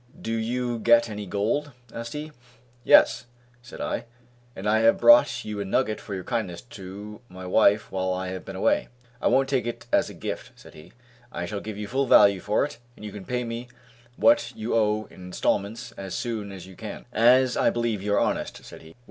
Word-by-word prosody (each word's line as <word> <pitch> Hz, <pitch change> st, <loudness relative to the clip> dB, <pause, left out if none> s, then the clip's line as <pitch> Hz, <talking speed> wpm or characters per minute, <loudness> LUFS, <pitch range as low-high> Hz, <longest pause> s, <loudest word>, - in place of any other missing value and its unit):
"Did 115 Hz, 0 st, -2 dB
you 120 Hz, 0 st, -2 dB
get 115 Hz, 0 st, +4 dB
any 105 Hz, -1 st, -6 dB
gold?" 115 Hz, +10 st, -1 dB, 0.2 s
asked 115 Hz, 0 st, -6 dB
he. 150 Hz, +1 st, -6 dB, 0.5 s
"Yes!" 120 Hz, +2 st, +5 dB, 0.3 s
said 120 Hz, -, -12 dB
I, -, -, -3 dB, 0.5 s
"and 95 Hz, +2 st, -5 dB
I 110 Hz, +1 st, +3 dB
have 115 Hz, +1 st, +4 dB
brought 120 Hz, +1 st, +5 dB
you 105 Hz, -1 st, -5 dB
a -, -, -1 dB
nugget 105 Hz, +2 st, 0 dB
for 100 Hz, -, -6 dB
your 95 Hz, -, -5 dB
kindness 100 Hz, -8 st, -3 dB
to 105 Hz, +2 st, -9 dB
my 95 Hz, 0 st, -9 dB
wife 105 Hz, +2 st, +3 dB
while 95 Hz, -1 st, -1 dB
I 95 Hz, 0 st, -3 dB
have 95 Hz, 0 st, -6 dB
been 95 Hz, -, -8 dB
away." 95 Hz, -, +1 dB, 0.3 s
"I -, -, +2 dB
won't 135 Hz, 0 st, +3 dB
take 130 Hz, -3 st, 0 dB
it 120 Hz, -, -5 dB
as -, -, +3 dB
a -, -, -10 dB
gift," -, -, -6 dB
said -, -, -16 dB
he, 75 Hz, -, -15 dB, 0.4 s
"I 90 Hz, -, -4 dB
shall 100 Hz, +3 st, -4 dB
give 110 Hz, -2 st, -7 dB
you 105 Hz, 0 st, -5 dB
full 135 Hz, +4 st, 0 dB
value 100 Hz, -4 st, +6 dB
for 105 Hz, +8 st, +1 dB
it 145 Hz, -, -9 dB, 0.2 s
and 105 Hz, -, -11 dB
you 105 Hz, -, -6 dB
can 100 Hz, -2 st, -9 dB
pay 125 Hz, 0 st, -2 dB
me 115 Hz, +1 st, -5 dB, 0.5 s
what 290 Hz, -, +4 dB
you 110 Hz, +2 st, -3 dB
owe 110 Hz, -1 st, +2 dB
in 90 Hz, -, -12 dB
instalments 100 Hz, +5 st, -2 dB
as 95 Hz, -2 st, -7 dB
soon 110 Hz, -4 st, -3 dB
as 95 Hz, -3 st, -9 dB
you 95 Hz, 0 st, -13 dB
can, 110 Hz, +1 st, -8 dB
as 125 Hz, +3 st, +5 dB
I -, -, +3 dB
believe 115 Hz, -4 st, -1 dB
you 105 Hz, +1 st, 0 dB
are -, -, +3 dB
honest," -, -, -2 dB
said -, -, -12 dB
he. 80 Hz, 0 st, -15 dB
110 Hz, 215 wpm, -25 LUFS, 100-120 Hz, 0.5 s, value